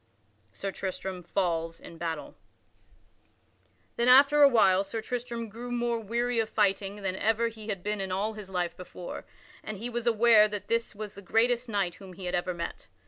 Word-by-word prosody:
[Sidenote: -, -, -28 dB
Sir 195 Hz, -, -3 dB
Tristram 190 Hz, -1 st, -4 dB
falls 165 Hz, -2 st, -1 dB
in -, -, -11 dB
the 165 Hz, -, -14 dB
battle] 165 Hz, -2 st, -4 dB, 1.6 s
Then 235 Hz, -, +2 dB
after 280 Hz, +3 st, +7 dB
a 285 Hz, -, +10 dB
while 195 Hz, -6 st, +4 dB
Sir 210 Hz, +3 st, -4 dB
Tristram 235 Hz, 0 st, -4 dB
grew 235 Hz, +3 st, -8 dB
more 240 Hz, -1 st, 0 dB
weary 235 Hz, +2 st, -1 dB
of 220 Hz, -1 st, 0 dB
fighting 200 Hz, -1 st, 0 dB
than 190 Hz, -1 st, -1 dB
ever 225 Hz, +3 st, +1 dB
he 220 Hz, -1 st, -11 dB
had 195 Hz, -4 st, -3 dB
been 210 Hz, -1 st, -2 dB
in 190 Hz, -1 st, -4 dB
all 200 Hz, +4 st, 0 dB
of -, -, -12 dB
his 210 Hz, -3 st, -9 dB
life 180 Hz, -2 st, -2 dB
before, 180 Hz, -1 st, -8 dB, 0.4 s
and 215 Hz, -, -5 dB
he 235 Hz, +5 st, -4 dB
was 240 Hz, 0 st, -3 dB
aware 225 Hz, -2 st, +6 dB
that 205 Hz, -1 st, -6 dB
this 230 Hz, -1 st, 0 dB
was 210 Hz, 0 st, -6 dB
the 200 Hz, -, -11 dB
greatest 235 Hz, +5 st, +1 dB
knight 200 Hz, -5 st, 0 dB
whom 190 Hz, -1 st, -10 dB
he 185 Hz, +1 st, -9 dB
had 180 Hz, -, -3 dB
ever 180 Hz, 0 st, -1 dB
met. 170 Hz, 0 st, -6 dB
210 Hz, 200 wpm, -29 LUFS, 190-235 Hz, 1.6 s, a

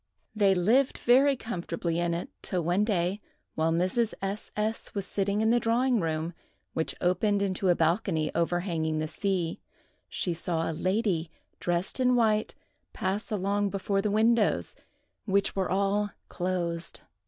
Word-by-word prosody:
They 200 Hz, -3 st, +4 dB
lived 230 Hz, +10 st, +3 dB
very 270 Hz, +3 st, +5 dB
comfortably 170 Hz, -7 st, -3 dB
in 170 Hz, -1 st, 0 dB
it 170 Hz, -, -5 dB
till 180 Hz, -2 st, -2 dB
one 175 Hz, +5 st, +2 dB
day, 195 Hz, -1 st, 0 dB, 0.3 s
while 160 Hz, +1 st, +1 dB
Mrs. 185 Hz, +7 st, +1 dB
S—— 195 Hz, +2 st, -4 dB
S—— 215 Hz, +1 st, -2 dB
was 200 Hz, -1 st, -2 dB
sitting 200 Hz, +2 st, 0 dB
in 220 Hz, +1 st, +3 dB
the 240 Hz, -, +4 dB
drawing 240 Hz, +2 st, +2 dB
room, 160 Hz, 0 st, -2 dB, 0.4 s
which 160 Hz, -, -1 dB
opened 200 Hz, +3 st, +2 dB
into 190 Hz, -1 st, 0 dB
a 175 Hz, -, +5 dB
balcony 165 Hz, -1 st, +1 dB
overhanging 170 Hz, -2 st, 0 dB
the 155 Hz, 0 st, -1 dB
sea, 175 Hz, 0 st, -2 dB, 0.5 s
she 175 Hz, -, 0 dB
saw 165 Hz, 0 st, -2 dB
a -, -, -2 dB
lady 185 Hz, -2 st, 0 dB, 0.3 s
dressed 175 Hz, +7 st, -1 dB
in 250 Hz, -1 st, +4 dB
white 215 Hz, -3 st, +2 dB, 0.4 s
pass 195 Hz, +5 st, -2 dB
along 200 Hz, 0 st, 0 dB
before 195 Hz, 0 st, 0 dB
the 210 Hz, -, 0 dB
windows, 220 Hz, +1 st, +3 dB, 0.5 s
which 200 Hz, -1 st, +1 dB
were 190 Hz, -1 st, 0 dB
all 200 Hz, +2 st, +1 dB, 0.2 s
closed. 175 Hz, -2 st, -2 dB
195 Hz, 150 wpm, -28 LUFS, 170-210 Hz, 0.5 s, very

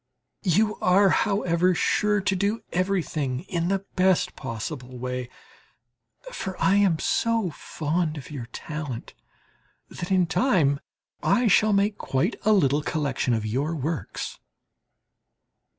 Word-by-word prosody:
You 210 Hz, +5 st, +3 dB
are, 190 Hz, +2 st, +4 dB
however, 185 Hz, -4 st, +2 dB
sure 210 Hz, +2 st, +2 dB
to 190 Hz, 0 st, +1 dB
do 200 Hz, +4 st, 0 dB
everything 165 Hz, -8 st, -1 dB
in 170 Hz, -1 st, -2 dB
the 195 Hz, +1 st, -1 dB
best 185 Hz, -1 st, +2 dB
possible 125 Hz, +1 st, -6 dB
way; 125 Hz, 0 st, -4 dB, 1.0 s
for 190 Hz, -1 st, -5 dB
I 195 Hz, -, +4 dB
am 195 Hz, -5 st, +3 dB
so 225 Hz, 0 st, +1 dB
fond 155 Hz, +2 st, -2 dB
of 140 Hz, -, -9 dB
your 130 Hz, -5 st, -6 dB
talent 145 Hz, -2 st, -6 dB, 0.8 s
that 175 Hz, -, -6 dB
in 185 Hz, -2 st, +4 dB
time 165 Hz, -, +2 dB, 0.4 s
I 245 Hz, -, +2 dB
shall 215 Hz, +1 st, +4 dB
make 200 Hz, +1 st, +1 dB
quite 160 Hz, -, 0 dB
a 215 Hz, -, +4 dB
little 150 Hz, -8 st, +3 dB
collection 145 Hz, -6 st, -1 dB
of 110 Hz, -1 st, -2 dB
your 140 Hz, +9 st, -1 dB
works. 155 Hz, +1 st, -4 dB
170 Hz, 125 wpm, -25 LUFS, 140-195 Hz, 1.0 s, are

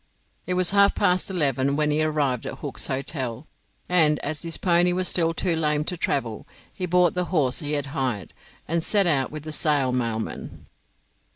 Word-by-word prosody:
It 180 Hz, -, 0 dB
was 180 Hz, 0 st, +2 dB
half 200 Hz, 0 st, +5 dB
past 185 Hz, -2 st, +1 dB
eleven 140 Hz, -6 st, +1 dB
when 150 Hz, 0 st, +1 dB
he 150 Hz, +1 st, +1 dB
arrived 145 Hz, -6 st, 0 dB
at -, -, -5 dB
Hook's -, -, -4 dB
Hotel, 130 Hz, -1 st, -4 dB, 0.4 s
and, 160 Hz, -4 st, +4 dB
as 145 Hz, +1 st, -3 dB
his 165 Hz, -1 st, -1 dB
pony 175 Hz, 0 st, +3 dB
was 185 Hz, 0 st, 0 dB
still 165 Hz, -2 st, +2 dB
too 170 Hz, +1 st, -1 dB
lame 150 Hz, -2 st, +1 dB
to 180 Hz, -, -3 dB
travel, 120 Hz, -9 st, -2 dB, 0.3 s
he 185 Hz, -2 st, -4 dB
bought 180 Hz, -1 st, +3 dB
the 180 Hz, 0 st, -1 dB
horse 150 Hz, -8 st, 0 dB
he 150 Hz, -2 st, -2 dB
had 145 Hz, -1 st, 0 dB
hired, 125 Hz, -, -2 dB, 0.3 s
and 170 Hz, +2 st, 0 dB
set 200 Hz, +4 st, +3 dB
out 140 Hz, -6 st, +2 dB
with 155 Hz, -1 st, -7 dB
the 155 Hz, -, -6 dB
Sale 145 Hz, -4 st, +1 dB
mailman. 115 Hz, -3 st, -4 dB
155 Hz, 185 wpm, -24 LUFS, 135-175 Hz, 0.4 s, half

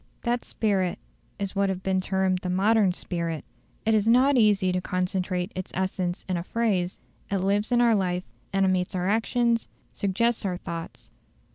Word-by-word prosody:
That 240 Hz, 0 st, 0 dB
spirit 195 Hz, -5 st, 0 dB, 0.4 s
is 200 Hz, -1 st, -4 dB
what 200 Hz, 0 st, +2 dB
has 190 Hz, -, -1 dB
been 190 Hz, 0 st, 0 dB
termed 190 Hz, -1 st, +1 dB
the 180 Hz, -, -4 dB
"modern 200 Hz, +2 st, +3 dB
spirit". 170 Hz, -3 st, -3 dB, 0.4 s
It 220 Hz, -, +3 dB
is 215 Hz, 0 st, +2 dB
not 255 Hz, +4 st, +5 dB
easy 205 Hz, -5 st, +4 dB
to 180 Hz, 0 st, 0 dB
concentrate 180 Hz, 0 st, -1 dB
its 185 Hz, 0 st, -5 dB
essence 185 Hz, -1 st, -2 dB
in 185 Hz, -2 st, 0 dB
a 170 Hz, -, -3 dB
phrase; 190 Hz, -4 st, 0 dB, 0.3 s
it 200 Hz, -, +1 dB
lives 200 Hz, +4 st, 0 dB
in 240 Hz, 0 st, +4 dB
our 235 Hz, -1 st, +5 dB
life, 180 Hz, -3 st, 0 dB, 0.3 s
animates 185 Hz, -1 st, +1 dB
our 180 Hz, 0 st, 0 dB
actions, 230 Hz, +2 st, +1 dB, 0.3 s
suggests 225 Hz, +4 st, 0 dB
our 185 Hz, -3 st, -1 dB
thoughts. 170 Hz, -2 st, -7 dB
190 Hz, 165 wpm, -26 LUFS, 180-215 Hz, 0.4 s, not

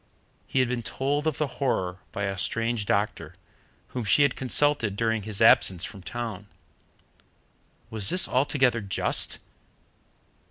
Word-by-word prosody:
He 130 Hz, -, +1 dB
had 130 Hz, -, +1 dB
been 125 Hz, -1 st, -2 dB
told 145 Hz, +6 st, -2 dB
of 155 Hz, -, -1 dB
the 150 Hz, -, 0 dB, 0.2 s
horror 95 Hz, -8 st, -1 dB
by 100 Hz, -, -4 dB
a 100 Hz, -1 st, -2 dB
strange 115 Hz, +2 st, -1 dB
doctor, 100 Hz, +1 st, -1 dB, 0.5 s
whom 125 Hz, -, -4 dB
she 130 Hz, +7 st, +4 dB
had 140 Hz, -3 st, +1 dB
consulted 130 Hz, -4 st, +1 dB
during 115 Hz, 0 st, 0 dB
his 105 Hz, 0 st, -1 dB
absence 90 Hz, -1 st, +5 dB
from 100 Hz, -, -10 dB
town. 110 Hz, -2 st, -6 dB, 1.4 s
Was 105 Hz, -3 st, +3 dB
this 185 Hz, -, +3 dB
altogether 130 Hz, -2 st, +1 dB
just? 100 Hz, -2 st, +1 dB
115 Hz, 135 wpm, -26 LUFS, 100-130 Hz, 1.4 s, absence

